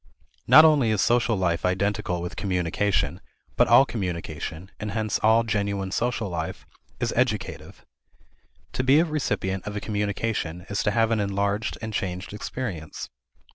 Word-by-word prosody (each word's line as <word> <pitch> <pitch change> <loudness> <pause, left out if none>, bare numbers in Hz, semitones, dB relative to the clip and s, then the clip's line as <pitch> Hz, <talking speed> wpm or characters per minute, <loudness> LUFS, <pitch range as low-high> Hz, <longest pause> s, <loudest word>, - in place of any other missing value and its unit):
Not 155 - +9
only 145 -7 +4
is 110 -2 +1
social 120 0 +3
life 85 -2 0
identical 95 -1 0
with 90 +2 -5
communication, 90 -2 0 0.3
but - - +4
all 135 - +7
communication 90 - -5
(and 105 -1 -4
hence 110 -1 -1
all 110 +1 +4
genuine 100 -3 -2
social 120 0 -1
life) 85 -3 -5 0.3
is - - -1
educative. - - -2 0.9
To 130 - -1
be 135 +4 +5
a 170 - +4
recipient 100 - -2
of 105 - -4
a - - -1
communication 100 -4 -2
is 100 - 0
to 105 - +1
have 115 +1 +2
an 115 - +2
enlarged 100 +1 -1
and 110 -1 -4
changed 95 0 -3
experience. 105 -8 -5
100 Hz, 150 wpm, -25 LUFS, 90-115 Hz, 0.9 s, Not